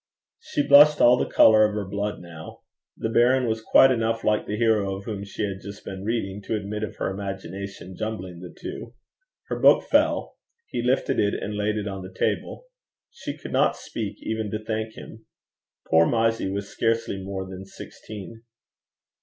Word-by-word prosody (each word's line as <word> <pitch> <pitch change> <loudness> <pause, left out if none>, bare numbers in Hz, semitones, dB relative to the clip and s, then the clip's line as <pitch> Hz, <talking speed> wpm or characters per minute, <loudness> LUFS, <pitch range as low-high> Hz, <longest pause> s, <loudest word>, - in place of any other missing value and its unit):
She 145 - -2
blushed 150 +1 +8
all 120 +1 +7
the - - -2
colour 110 -1 +6
of 105 -1 +1
her 105 -2 -2
blood 100 0 -3
now. 85 -2 -11 0.4
The - - -2
baron 125 +3 +3
was 110 -1 -1
quite 135 +4 +6
enough 115 -2 0
like 105 0 +1
the 105 - -2
hero 105 -4 +2
of 100 - -8
whom 100 -3 -4
she 100 +2 -5
had 100 -2 -3
just 100 +1 -10
been 95 0 -6
reading 105 -3 -2
to - - 0
admit 105 0 -4
of 110 - -4
her - - -2
imagination 95 -1 -6
jumbling 95 -5 -5
the 90 0 -9
two. 120 +1 -8 0.5
Her - - -2
book - - +6
fell. - - +1 0.3
He - - -4
lifted 125 +3 +1
it 100 -1 +2
and 105 - -4
laid 105 +1 0
it 105 -1 -3
on 95 -1 -5
the 95 0 -9
table. 95 - -2 0.5
She 470 - -7
could - - -9
not - - +3
speak 105 -2 -6
even 110 -1 -2
to 110 +1 -5
thank 110 0 -3
him. - - -12 0.6
Poor 80 +1 +5
Mysie 115 -3 +1
was 100 +1 -3
scarcely 115 -4 -1
more 95 -1 -5
than 95 0 -8
sixteen. 105 +2 -10
105 Hz, 185 wpm, -25 LUFS, 95-115 Hz, 0.6 s, blushed